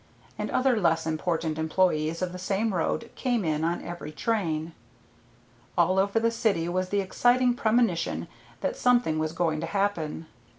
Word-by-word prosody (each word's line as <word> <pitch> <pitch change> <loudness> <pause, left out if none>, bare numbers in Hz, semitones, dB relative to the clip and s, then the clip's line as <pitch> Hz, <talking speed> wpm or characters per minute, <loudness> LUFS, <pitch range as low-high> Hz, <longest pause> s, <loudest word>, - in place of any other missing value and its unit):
and - - -4
other 255 -3 +2
less 165 -2 +2
important 160 0 -1
employees 160 0 +1
of 180 - -2
the 180 - -7
same 200 +3 0
road 210 +6 -1
came 240 -6 -1
in 155 -1 0
on 170 +1 -1
every 175 -3 -7
train. 165 -4 -1 1.0
All 185 +2 +3
over 200 +3 +2
the 230 0 +2
city 210 -7 0
was 185 +1 -1
the 200 0 +1
exciting 245 +6 +3
premonition 225 -8 +1 0.3
that - - -1
something 240 - +2
was 155 0 -1
going 165 -2 0
to 165 - -3
happen. 165 -4 -1
180 Hz, 160 wpm, -27 LUFS, 160-220 Hz, 1.0 s, All